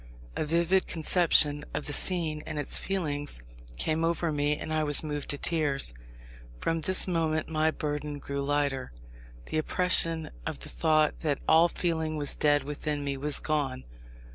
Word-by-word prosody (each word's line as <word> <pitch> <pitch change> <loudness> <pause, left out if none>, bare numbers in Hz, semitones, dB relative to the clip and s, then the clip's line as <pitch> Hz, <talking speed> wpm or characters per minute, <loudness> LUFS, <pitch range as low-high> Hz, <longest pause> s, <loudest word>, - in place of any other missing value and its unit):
A - - -1
vivid 170 +4 +2
conception 155 -3 +3
of 150 - -3
the 145 - -2
scene 160 -4 +1
and 155 -1 -5
its 145 - +1
feelings 145 - -2 0.3
came 160 - 0
over 170 0 0
me, 145 0 0
and 155 - -5
I 155 0 +1
was 145 0 +4
moved 150 -2 -5
to 145 - +2
tears. 145 - +1 0.7
From 165 - -1
this 185 +5 +2
moment 160 -3 -1
my 155 0 +1
burden 150 -1 -4
grew 140 0 -4
lighter. 140 -2 -1 0.5
The 155 - -2
oppression 165 -1 +2
of - - -4
the - - -8
thought 155 -1 +1
that 145 -4 -1
all 160 +2 +6
feeling 160 -2 -2
was 145 -1 0
dead 145 -1 +2
within 150 +1 -3
me 140 -1 -2
was 145 +1 +2
gone. 140 -4 -2
155 Hz, 165 wpm, -28 LUFS, 145-165 Hz, 0.7 s, all